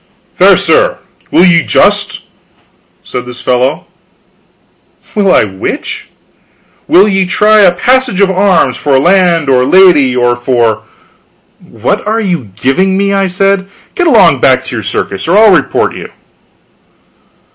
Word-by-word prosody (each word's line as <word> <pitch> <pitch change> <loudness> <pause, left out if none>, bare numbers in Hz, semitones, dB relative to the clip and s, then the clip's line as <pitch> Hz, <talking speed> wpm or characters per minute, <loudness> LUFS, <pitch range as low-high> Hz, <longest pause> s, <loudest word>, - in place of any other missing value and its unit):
"Fair - - +3
sir, - - 0 0.3
will 180 - +3
ye 170 -2 +3
just?" - - 0 0.8
said 125 - -6
this 125 0 -9
fellow. 130 +4 -2 1.3
"Will 200 -3 +1
I - - +3
which?" 95 -2 -6 0.8
"Will 190 +4 +4
ye 195 -2 0
try 215 +3 +2
a 190 -3 +4
passage 245 +3 0
of 195 -1 +2
arms 185 -9 +1
for 140 -2 0
land 175 0 +1
or 130 -2 +2
lady 150 -6 +3
or 120 0 +1
for 120 -3 -1 0.4
" - - -41 0.2
"What - - -2
are 220 +2 -1
you 175 - -4
giving 190 +9 0
me?" 200 0 -1
I 195 -1 0
said. 195 +1 -1 0.3
"Get 355 - -1
along 225 - +3
back 130 0 +1
to 130 - -7
your 110 - -4
circus, 100 +1 -5
or 180 +5 +2
I'll 215 -2 +5
report 170 - -1
you." - - -9
180 Hz, 145 wpm, -9 LUFS, 130-195 Hz, 1.3 s, I'll